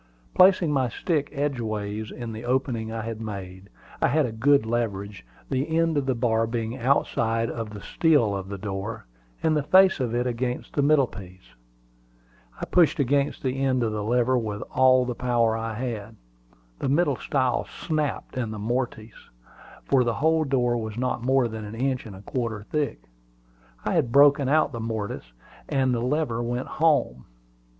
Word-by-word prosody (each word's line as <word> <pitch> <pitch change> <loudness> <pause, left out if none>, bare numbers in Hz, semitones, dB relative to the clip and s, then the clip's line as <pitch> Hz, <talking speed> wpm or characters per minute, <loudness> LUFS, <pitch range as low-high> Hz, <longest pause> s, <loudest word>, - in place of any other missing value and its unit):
Placing 185 -4 +5
my 130 -4 +1
stick 150 +3 -1
edgeways 110 -7 -3
in 120 -2 -6
the 110 +1 -7
opening 120 -3 -1
I 115 -1 -4
had 115 0 -5
made, 95 -3 -7 0.3
I - - +4
had 150 +2 +2
a 120 - -3
good 130 +3 +3
leverage, 105 - -3 0.2
the 140 +4 -1
end 165 -1 +2
of 140 -2 0
the 130 - +1
bar 115 -1 +1
being 115 0 -3
outside 115 -3 +1
of 115 -2 -5
the 105 -1 -9
stile 145 -10 +2
of 95 -1 -5
the 100 - -5
door, 100 - -5 0.4
and 160 -1 +3
the 150 - +2
face 190 +4 +5
of 120 -3 -1
it 120 +1 0
against 125 0 -3
the 145 - +1
middle 145 -1 +4
piece. 90 - -13 1.1
I - - -3
pushed 175 -4 +3
against 140 +2 0
the 135 0 -1
end 130 -2 +2
of 110 - 0
the 105 -1 -3
lever 120 +3 +2
with 105 -3 -4
all 130 -1 +5
the 125 - -2
power 120 -2 +1
I 115 0 -3
had. 110 -3 -5 0.6
The 135 - -1
middle 145 -2 +2
stile 130 -3 0
snapped 155 -4 -3
in 125 -3 -2
the 110 - -6
mortise, 115 0 -4 0.6
for 135 -2 +3
the 120 -1 -1
whole 160 +1 +2
door 125 -3 +1
was 110 -1 -5
not 125 -1 -1
more 130 -1 +3
than 110 -1 -6
an 105 +1 -7
inch 130 0 -1
and 100 - -9
a 95 - -12
quarter 115 -3 -3
thick. 150 +5 -3 0.8
I - - 0
had 115 - +1
broken 140 0 +5
out 155 +1 +3
the 115 - -6
mortise, 110 - -4 0.4
and 130 -2 +1
the 120 - -1
lever 125 -2 0
went 120 +2 -2
"home." 145 - +1
120 Hz, 180 wpm, -25 LUFS, 110-140 Hz, 1.1 s, Placing